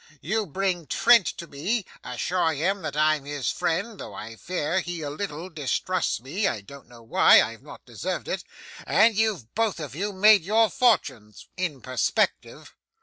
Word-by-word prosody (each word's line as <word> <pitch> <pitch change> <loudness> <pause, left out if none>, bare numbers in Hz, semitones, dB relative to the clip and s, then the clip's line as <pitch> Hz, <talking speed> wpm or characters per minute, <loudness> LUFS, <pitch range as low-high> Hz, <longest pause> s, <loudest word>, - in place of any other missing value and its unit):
You 215 +8 -2
bring 180 0 -2
Trent 230 - +5
to 170 - -5
me; 185 +9 -2 0.2
assure 160 +7 -1
him 190 +7 -1
that 150 - -5
I'm 155 -2 +2
his 145 -3 -2
friend 195 +6 -2
though - - -8
I 115 +1 -8
fear 170 +5 -2
he 175 -3 -5
a 145 - -4
little 165 0 -5
distrusts 170 +3 -1
me 160 - -2
(I 105 - -2
don't 140 +6 -13
know 120 -1 -15
why, 115 - +6
I - - +1
have - - -13
not - - -13
deserved - - -5
it); - - -3 0.4
and 220 +2 +4
you've 200 - -1
both 220 -4 0
of 145 -5 -6
you 200 +7 -3
made 205 +2 +6
your 215 +4 +2
fortunes 130 - 0
in 175 -8 -3
perspective. 130 -1 -1
170 Hz, 175 wpm, -25 LUFS, 140-200 Hz, 0.4 s, why